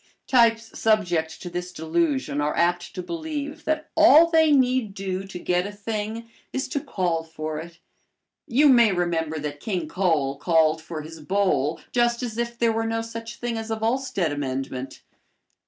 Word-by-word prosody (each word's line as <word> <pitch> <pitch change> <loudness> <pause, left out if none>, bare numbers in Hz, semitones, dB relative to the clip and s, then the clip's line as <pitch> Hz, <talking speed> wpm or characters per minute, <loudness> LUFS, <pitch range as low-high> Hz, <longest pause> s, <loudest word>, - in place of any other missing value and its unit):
Types 230 -3 +2
subject 175 -8 +1
to - - -6
this 175 +1 -5
delusion 180 - -1
are 150 +1 -1
apt 175 +1 0
to 180 - -4
believe 305 - -5
that 310 0 -2
all 320 0 +8
they 320 -2 +5
need 255 -6 +2
do 195 -1 -4
to 195 - -7
get 180 +1 0
a - - -6
thing 215 +2 -4 0.2
is 265 - -2
to 285 - -2
call 175 -9 -1
for 155 -1 -5
it. 165 +1 -10 0.7
You 285 +3 +4
may 240 -5 +6
remember 165 -3 -1
that 145 -1 -5
King 180 -5 -3
Cole 150 -6 0
called 160 -1 +3
for 160 -1 -6
his 160 +1 -10
bowl 165 -3 0
just 240 0 +1
as 230 -2 -4
if 235 0 -2
there 235 -1 +2
were 225 0 -1
no 225 0 -1
such 230 0 -7
thing 235 -2 -3
as 225 0 -6
a 220 - 0
Volstead 225 - -1
amendment. 135 -2 -4
200 Hz, 170 wpm, -24 LUFS, 160-235 Hz, 0.7 s, all